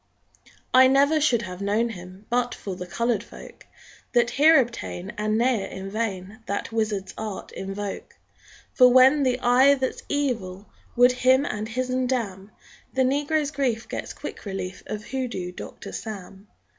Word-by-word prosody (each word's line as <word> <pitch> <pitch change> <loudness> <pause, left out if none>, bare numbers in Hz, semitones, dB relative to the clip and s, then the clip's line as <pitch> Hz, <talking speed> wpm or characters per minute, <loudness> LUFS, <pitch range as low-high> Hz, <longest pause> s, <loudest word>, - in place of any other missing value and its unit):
_ - - -19 0.2
I 260 0 +8
never 280 +4 +4
should 240 -6 +2
have 180 -1 -7
known 210 +4 +1
him 185 0 -10
But 245 0 0
for 195 -2 -6
the 180 0 -7
colored 230 +2 -1
folk - - -13 0.5
That 240 0 +3
here 310 +2 +6
obtain 230 -6 -3
And 215 +1 -1
ne'er 235 -4 +1
in 190 +1 -7
vain 205 -1 -4
That 200 +3 -3
wizard's 215 -3 -2
art 215 -3 -6
invoke; 195 +1 -6 0.6
For 250 -1 +6
when 260 +3 +6
the 255 -2 +1
Eye 260 +3 +5
that's 260 -1 -3
Evil 225 -10 -2 0.3
Would 245 +1 +6
him 260 +2 +3
and 215 -2 -4
his'n 255 +1 -1
damn, 205 -6 -3 0.4
The 265 - +1
negro's 290 +3 0
grief 255 -6 -1
gets - - -5
quick - - -8
relief 190 -2 -5
Of 210 0 -5
Hoodoo 245 -9 -4
Doctor - - -9
Sam. 200 -2 -8
230 Hz, 155 wpm, -25 LUFS, 200-260 Hz, 0.6 s, I